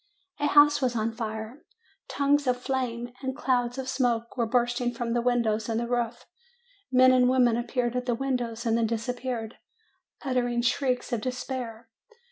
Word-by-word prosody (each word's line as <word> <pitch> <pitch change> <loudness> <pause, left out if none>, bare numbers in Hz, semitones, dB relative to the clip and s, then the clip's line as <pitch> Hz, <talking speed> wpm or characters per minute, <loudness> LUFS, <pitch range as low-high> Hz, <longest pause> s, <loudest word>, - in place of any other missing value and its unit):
A 290 - +1
house 290 0 +6
was 250 -2 0
on 225 0 0
fire. 220 +3 -6 0.4
Tongues 285 0 +1
of 250 0 +2
flame 245 -2 -3
and 265 0 -4
clouds 245 -3 0
of 265 -1 -4
smoke 235 -4 0
were 235 -3 0
bursting 240 0 0
from 230 -1 -2
the 240 - +1
windows 235 -3 +1
and 225 0 0
the 235 - -2
roof; 240 -1 -2 0.7
men 255 0 +6
and 250 -1 +4
women 250 -3 +4
appeared 240 0 -1
at 250 0 -2
the 240 - +1
windows 245 -3 -2
and 225 -1 +2
then 230 -1 +2
disappeared, 235 0 -4 0.7
uttering 245 -2 0
shrieks 250 0 0
of 230 - 0
despair. 250 -2 -5
245 Hz, 165 wpm, -27 LUFS, 235-255 Hz, 0.7 s, house